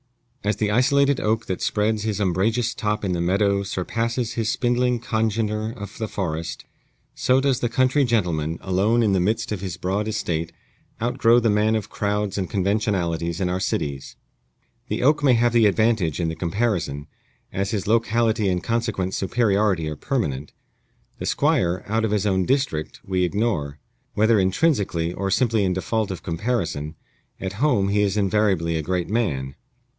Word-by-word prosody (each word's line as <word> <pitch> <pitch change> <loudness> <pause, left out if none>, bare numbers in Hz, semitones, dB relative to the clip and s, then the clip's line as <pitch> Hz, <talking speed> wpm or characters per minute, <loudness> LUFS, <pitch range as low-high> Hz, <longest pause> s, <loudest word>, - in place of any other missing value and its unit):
As 105 +1 +1
the 105 -1 0
isolated 140 +4 +3
oak 110 +1 0
that 95 - -4
spreads 105 0 0
his 105 -2 -2
umbrageous 110 +5 +1
top 105 -2 -2
in 95 - 0
the 85 -1 -1
meadow 100 +3 +2
surpasses 115 +5 -2
his 115 -2 -1
spindling 125 0 +1
congener 110 -1 -1
of 100 -1 -8
the 110 - -2
forest, 85 -5 -4 0.5
so 130 +1 +2
does 135 -2 +1
the 120 - 0
country 130 +4 +2
gentleman, 85 - 0
alone 100 +6 +2
in 105 - +2
the 95 - +3
midst 105 +6 0
of 105 -4 -3
his 90 -3 -5
broad 95 +4 -1
estate, 85 -7 -2 0.5
outgrow 120 0 +3
the 115 -2 +2
man 105 +2 +2
of 105 -2 -3
crowds 105 -1 -1
and 95 - -3
conventionalities 90 -5 0
in 95 - 0
our 90 +1 -1
cities. 70 -7 -3 0.7
The - - -2
oak 145 +2 +4
may 135 -3 +5
have 120 0 +2
the 115 -2 +5
advantage 105 -7 +1
in 85 -2 0
the 80 - -4
comparison, 85 -5 -1 0.5
as 100 +1 -1
his 100 -2 -2
locality 110 -1 +2
and 90 -1 -1
consequent 110 -5 -1
superiority 100 -5 +1
are 75 - -4
permanent. 75 - -2 0.7
The - - -4
Squire, 90 +1 +1
out 110 +2 0
of 110 - +1
his 105 -1 0
own 95 -2 +1
district, 130 - -1
we 95 -1 0
ignore. 90 -7 -1 0.4
Whether 110 0 +4
intrinsically, 95 - +1
or 100 +1 -2
simply 115 0 +2
in 95 -1 +1
default 110 +3 -1
of 95 - -6
comparison, 85 -5 -2 0.4
at 95 -1 -4
home 125 -10 +3
he 105 +1 +2
is 100 0 +1
invariably 95 -5 +1
a 80 - 0
great 90 +2 -2
man. 75 - -1
105 Hz, 170 wpm, -23 LUFS, 90-115 Hz, 0.7 s, may